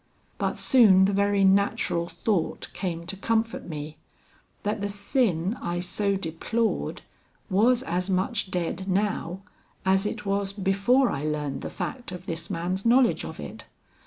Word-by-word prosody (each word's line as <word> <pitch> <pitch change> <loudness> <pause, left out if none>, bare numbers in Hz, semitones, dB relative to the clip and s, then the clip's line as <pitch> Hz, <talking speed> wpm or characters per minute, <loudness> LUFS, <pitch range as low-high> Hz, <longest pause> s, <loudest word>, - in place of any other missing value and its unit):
But - - -1
soon 200 -7 +6
the 200 - +1
very 200 0 +2
natural 190 -3 +2
thought 190 -1 -1
came 170 -3 -3
to 175 - -3
comfort 225 +2 -1
me, 150 -1 -6 0.7
that 210 0 -1
the 205 - -1
sin 200 - +1
I 175 0 -2
so 200 +3 -1
deplored 195 +6 -2 0.5
was 235 +6 +4
as 180 +3 -2
much 190 +2 0
dead 180 +1 -2
now, 190 -2 -1 0.4
as 190 +2 +3
it 210 0 -5
was 195 0 0
before 200 +6 +2
I 140 - -3
learned 150 -3 -2
the - - -4
fact 245 -7 -5
of 180 0 -8
this 165 -2 -5
man's 180 +3 -2
knowledge 245 +1 +4
of - - -7
it. - - -8
195 Hz, 150 wpm, -26 LUFS, 175-210 Hz, 0.7 s, soon